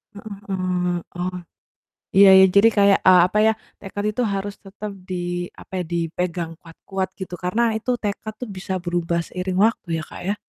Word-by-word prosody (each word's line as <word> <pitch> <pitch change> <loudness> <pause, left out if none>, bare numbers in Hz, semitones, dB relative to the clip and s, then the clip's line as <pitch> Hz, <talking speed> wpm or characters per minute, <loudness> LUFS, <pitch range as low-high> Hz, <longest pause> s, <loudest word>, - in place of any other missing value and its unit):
Heeh 200 0 -8
heeh. 180 -2 -1 0.2
Oh. 180 +1 -3 0.8
Iya 200 0 +9
iya, 190 - +8
jadi 220 +3 +8
kayak, 200 -1 +6
eee, 180 -1 +8
apa 210 - -1
ya, 220 - +5 0.3
tekad 205 +1 -5
itu 250 - 0
harus 200 +1 -3
tetap 205 +1 -7 0.2
di, 185 - -3 0.5
apa - - -16
ya, - - -8
dipegang 170 0 -2
kuat-kuat 185 +3 -5
gitu, 180 -1 -5
karena 200 +7 +1
itu 230 +3 -3
tekad 210 +1 -3
tuh 250 - -4
bisa 190 +1 -5
berubah 175 -1 -1
seiring 185 0 -3
waktu 225 -5 -3
ya - - -4
Kak, - - -9
ya. 205 - +1
190 Hz, 175 wpm, -22 LUFS, 180-200 Hz, 0.8 s, Iya